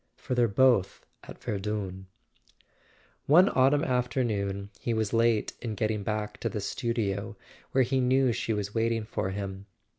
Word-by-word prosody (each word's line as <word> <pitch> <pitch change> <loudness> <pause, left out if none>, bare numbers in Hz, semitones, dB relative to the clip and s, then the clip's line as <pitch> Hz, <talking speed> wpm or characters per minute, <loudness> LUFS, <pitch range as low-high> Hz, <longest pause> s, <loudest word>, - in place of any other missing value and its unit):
For - - -4
they're 120 -1 +3
both 115 -2 +2 0.2
at - - -12
Verdun." 95 -2 -3 1.2
One 175 +7 +7
autumn 135 +3 +3
afternoon 110 -7 -1
he 115 - -1
was 110 -1 -1
late 115 -1 +2
in 115 -3 -4
getting 110 0 -1
back 105 0 -3
to - - -1
the 105 - -4
studio, 105 0 -2 0.3
where 130 - +4
he 130 +2 0
knew 130 0 +3
she 115 - -2
was 105 -1 -2
waiting 115 0 0
for 105 -3 -3
him. 100 0 -5
110 Hz, 150 wpm, -28 LUFS, 100-125 Hz, 1.2 s, One